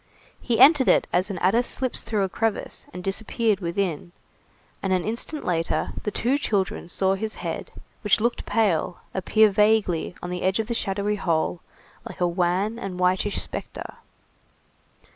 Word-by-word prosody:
He 230 -3 0
entered 270 0 +7
it - - +4
as 180 +3 +2
an 195 - -4
adder 195 +7 +3
slips 255 +1 -2
through 210 -3 -1
a - - +1
crevice, 225 +3 -2
and 180 0 -8
disappeared 215 +2 0
within, 175 -2 -2 0.7
and 195 - -1
an 185 -1 +2
instant 235 +7 -3
later, 165 -2 -1
the - - -2
two 250 +7 0
children 195 -8 -1
saw 190 +2 +1
his 215 +3 -2
head, - - -5 0.3
which 210 +1 +4
looked 235 +2 -1
pale, 185 -5 +1 0.2
appear 215 +3 +4
vaguely, 210 -5 +2
on 180 - -4
the 180 - -3
edge 190 +1 +1
of 220 - -1
the 235 - -3
shadowy 205 -1 0
hole, 170 -2 0 0.4
like - - -9
a 180 - +2
wan 180 +6 0
and 185 -4 -5
whitish 185 +3 +1
spectre. - - -7
195 Hz, 160 wpm, -24 LUFS, 180-220 Hz, 0.7 s, entered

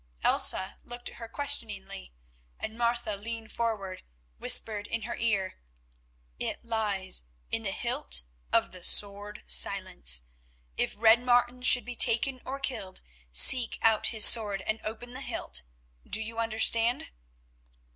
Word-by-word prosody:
Elsa 190 +1 +4
looked 240 0 -5
at - - -15
her 230 - -9
questioningly, 225 - -4 0.5
and 220 - -6
Martha, 235 -2 -2
leaning 225 +2 -6
forward, 215 -5 -5 0.4
whispered 210 -2 +1
in 230 -1 -5
her 235 - -5
ear: 205 -5 -2 0.8
"It - - -4
lies 205 - 0 0.3
in - - 0
the - - -2
hilt - - 0 0.3
of - - +2
the 180 -1 -8
Sword 205 +2 +4
Silence. - - 0 0.5
If - - -1
Red 225 +1 +5
Martin 245 0 +1
should 250 0 +5
be 245 0 -7
taken 245 +3 +3
or 270 +1 -6
killed, 215 -9 -4 0.3
seek 230 - +5
out 220 -1 +3
his 220 -2 +3
sword 205 -4 +3
and 215 +1 -3
open 235 +3 -7
the 260 - -6
hilt. - - -3 0.5
Do - - +2
you 225 +1 -6
understand?" 230 - +1
225 Hz, 135 wpm, -27 LUFS, 200-240 Hz, 0.8 s, Red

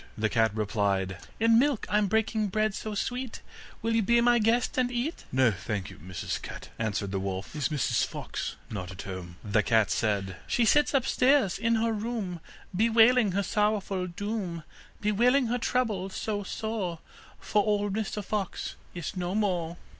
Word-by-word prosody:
The 110 0 +1
cat 110 0 +3
replied: 100 -3 0 0.2
'In 225 0 +5
milk 275 -3 +1
I'm 210 -1 +2
breaking 220 +1 +1
bread 215 +1 +1
so 215 +1 -5
sweet, 250 +3 -3 0.4
Will 230 0 +1
you 225 - +4
be 235 +3 +4
my 240 0 +4
guest, 230 +3 +2
and 250 -1 +2
eat?' 250 +7 -3
'No, 130 -2 +4
thank 100 0 -4
you, 95 - -12
Mrs 90 +2 -4
Cat,' - - -8
answered 100 -3 -1
the 95 - -1
wolf. 95 +6 -4
'Is 150 - 0
Mrs 150 -5 +1
Fox - - -4 0.2
not 90 -4 -4
at 95 - -8
home?' 90 -2 -7
The 105 0 +2
cat 110 -2 +3
said: 100 -4 0
'She 240 - +2
sits 295 +4 +4
upstairs 255 -5 +3
in 230 +1 +2
her 225 0 +1
room, 210 -5 -3 0.4
Bewailing 225 0 +5
her 200 +1 +1
sorrowful 205 -3 0
doom, 185 -2 -4 0.4
Bewailing 240 +6 +3
her 245 - 0
trouble 220 -7 0
so 205 +2 -3
sore, 205 -4 -3 0.4
For 210 - +1
old 205 -1 +1
Mr 210 -1 -3
Fox 200 -3 -3 0.2
is 175 +2 -5
no 180 +1 -2
more. 175 -5 0
205 Hz, 170 wpm, -28 LUFS, -, 0.4 s, In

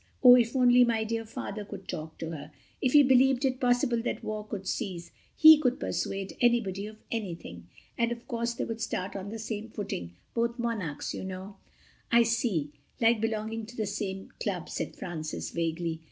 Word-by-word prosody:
Oh, 250 -1 +11
if 240 0 +4
only 250 -1 +6
my 230 -2 +1
dear 225 +1 -2
Father 215 -1 -5
could 200 -1 -9
talk 160 -2 -6
to 165 0 -5
her. 150 -2 -7 0.3
If 255 - +1
he 295 -1 +9
believed 265 0 +4
it 255 -1 0
possible 245 -1 +2
that 235 - -3
war 215 0 -3
could 195 -3 -5
cease... 180 -7 -3 0.2
he 315 -1 +9
could 255 -4 +1
persuade 195 0 -3
anybody 210 -5 +2
of 215 0 -11
anything. 170 - -5 0.3
And, 235 0 +2
of 235 0 -6
course, 235 -2 -2
they - - -2
would 225 0 -5
start 190 -4 -3
on 195 0 -5
the 225 - -5
same 220 0 -5
footing—both 205 - -4
Monarchs, 215 - -3
you - - -5
know." 190 +1 -7 0.5
"I 235 0 +7
see: 220 - 0 0.3
like 225 -1 +4
belonging 220 0 -2
to 245 - -12
the 215 - 0
same 195 -1 -4
club," - - -3
said - - -4
Francis 155 -3 -5
vaguely. 165 -1 -2
220 Hz, 180 wpm, -29 LUFS, 190-235 Hz, 0.5 s, Oh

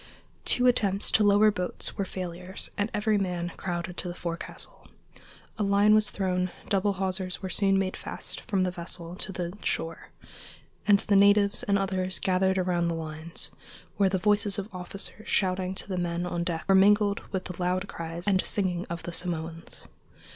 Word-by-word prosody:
Two 250 - +4
attempts 205 -5 +3
to 215 - +4
lower 205 +1 +6
boats 180 -3 -1
were 195 - -1
failures 185 0 -5
and 205 +2 0
every 210 0 +1
man 180 -2 -2
crowded 175 -1 -4
to - - -3
the 175 - -5
forecastle. 170 -1 -6 0.7
A - - +2
line 200 +1 +4
was 215 0 +4
thrown, 185 -2 -1 0.2
double 200 0 +2
hawsers 185 0 -2
were 190 - -3
soon 195 +1 +3
made 190 -1 0
fast - - -4
from 190 -2 +2
the 180 - 0
vessel 170 -1 -5
to 195 - -3
the 175 0 -4
shore, 165 0 -3 0.8
and 205 -1 +7
the 205 - +1
natives 200 0 +5
and 200 -1 +2
others 185 -1 0
gathered 190 0 +2
around 180 -2 +1
the 170 - -1
lines, 160 +1 -5 0.5
where 195 -2 +4
the 190 - +1
voices 205 +1 +2
of 200 +1 -5
officers 195 +4 -7
shouting 185 -1 0
to - - -4
the 185 -2 -2
men 175 0 -1
on 175 -1 -2
deck 170 -2 -3
were 195 - +5
mingled 205 +1 +5
with 190 -2 -2
the 180 0 -6
loud 185 +2 0
cries 170 +1 -5
and 190 -2 +3
singing 180 -3 -1
of 170 -1 -5
the 175 - -6
Samoans. 165 -2 -3
185 Hz, 180 wpm, -28 LUFS, 175-200 Hz, 0.8 s, and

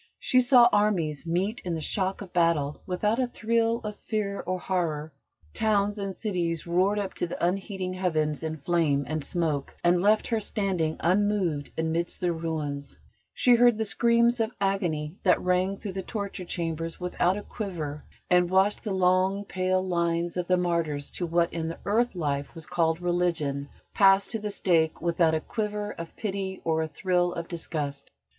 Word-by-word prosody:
She 255 - +3
saw 245 -1 +7
armies 170 -8 +1
meet 190 +7 -1
in 175 -2 -2
the - - -3
shock 190 +5 -1
of 185 - -13
battle 165 -5 +1
without 210 +6 0
a 255 - +2
thrill 230 0 0
of 210 -1 -5
fear 205 -3 -3
or 185 0 0
horror; 160 -5 -2 0.4
towns 205 -1 +1
and 195 -1 -4
cities 175 -6 -2
roared 185 +4 +2
up 200 -2 -2
to - - -2
the 170 - -2
unheeding 190 0 -2
heavens 155 -5 0
in 160 -1 -3
flame 150 -2 +1
and 155 -1 -2
smoke, 155 -5 -2
and 175 0 +4
left 210 +2 +3
her 225 -2 +1
standing 190 -7 -1
unmoved 185 -5 +1
amidst 160 +1 -1
their 175 -1 0
ruins; 155 -4 -4 0.4
she 250 - +4
heard 240 -1 +5
the 220 - 0
screams 235 +2 +3
of 225 -1 +1
agony 175 -5 -1
that 180 - +4
rang 180 +2 +1
through 200 - -6
the 190 +1 -4
torture 200 -2 -5
chambers 165 -1 -3
without 180 +1 +1
a 205 - -6
quiver, 160 -9 -5 0.2
and 180 -1 +3
watched 190 +2 +3
the 210 - -3
long, 190 +2 +2
pale 185 0 0
lines 170 -1 0
of 180 -1 -2
the 180 - +3
martyrs 170 -5 -1
to 175 - -3
what 170 +1 +1
in 165 -1 -2
the 165 - -5
earth 225 +2 +1
life 145 -4 -2
was 165 -2 -8
called 165 -1 +1
Religion 165 -6 0 0.2
pass 195 -1 +5
to 225 +3 -3
the 210 0 -4
stake 165 -5 +1
without 170 -1 +2
a - - +1
quiver 210 0 -3
of 165 -3 -8
pity 195 -2 -3
or 160 -1 +1
a 160 - -1
thrill 175 +3 0
of 170 0 -4
disgust. 150 -5 -4
180 Hz, 180 wpm, -27 LUFS, 165-200 Hz, 0.4 s, saw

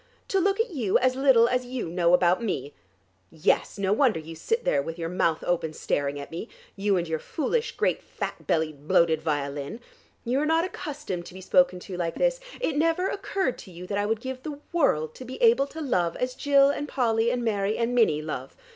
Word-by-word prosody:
To 390 - +2
look 395 +2 +1
at 455 -1 +1
you, 235 - +2
as 255 0 +2
little 260 -4 +5
as 250 +1 0
you 250 -6 -4
know 170 +1 +3
about 180 +5 +2
me. 165 -9 -3 0.6
Yes; 165 +5 0
no 195 0 +1
wonder 230 - +3
you 160 +1 -9
sit 455 - -2
there 140 - +2
with 165 +4 -6
your 165 -1 -3
mouth 170 -3 0
open 165 -3 0
staring 145 -2 -1
at 140 - -8
me, 170 +8 -6 0.3
you 200 -1 +1
and 175 -1 -1
your 160 -1 -2
foolish, 450 - -2
great - - +1
fat - - -6
bellied 155 -4 -1
bloated 160 -1 +3
violin. 145 +4 -3 0.5
You 250 +3 +1
are 300 - +1
not 325 +2 +3
accustomed 290 - -5
to 185 - -12
be - - -8
spoken 185 -2 +3
to 185 -1 -7
like 170 -2 -2
this. - - +1 0.2
It 320 - -1
never 330 +4 +2
occurred 390 -7 -2
to 185 - -11
you 175 +1 -9
that 200 +2 -3
I 205 - 0
would 220 0 -1
give 260 0 -5
the 295 +1 -6 0.2
world 155 - +2
to - - -10
be 255 +1 -8
able 240 +4 +5
to 320 +3 -8
love 180 - 0
as 250 0 -2
Jill 280 +1 +4
and 290 +1 -4
Polly 230 -4 +1
and 245 0 -1
Mary 205 -1 0
and 235 +1 0
Minnie 185 -11 +3
love. 155 - -6
220 Hz, 220 wpm, -26 LUFS, 170-275 Hz, 0.6 s, little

